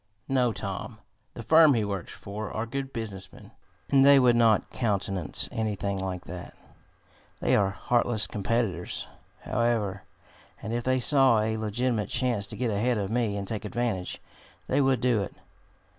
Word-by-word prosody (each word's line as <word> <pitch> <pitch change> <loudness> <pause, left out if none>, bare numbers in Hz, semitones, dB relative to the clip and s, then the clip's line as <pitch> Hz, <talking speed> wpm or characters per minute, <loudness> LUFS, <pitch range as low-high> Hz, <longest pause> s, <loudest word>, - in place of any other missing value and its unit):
"No, 125 -3 +2
Tom. - - -5 0.4
The 120 - -7
firm 155 +2 +6
he 110 -2 +1
works 100 -4 -4
for 105 +2 -7
are 110 - -3
good 135 +3 -4
business 105 -6 -6
men, - - -15 0.4
and 135 -1 +6
they 140 0 +8
would 125 -2 +5
not 115 -3 +3
countenance 100 -6 -1
anything 100 -3 -2
like 95 -2 -4
that. 90 0 -9 0.8
They - - +2
are 100 -1 +3
heartless 120 +1 +1
competitors, 105 -3 -2 0.4
however, 110 -5 0 0.6
and 110 +1 -5
if 120 0 -2
they 130 0 +2
saw 130 -4 +4
a 110 +1 0
legitimate 110 0 -1
chance 120 -5 0
to - - -5
get 125 -3 0
ahead 115 +4 +1
of 100 0 -3
me 115 -4 0
and 100 -1 -4
take 110 -1 -3
advantage, 105 -4 -2 0.5
they 140 +2 +2
would 130 -3 +2
do 120 -4 +2
it. 100 - -6
110 Hz, 160 wpm, -27 LUFS, 100-125 Hz, 0.8 s, they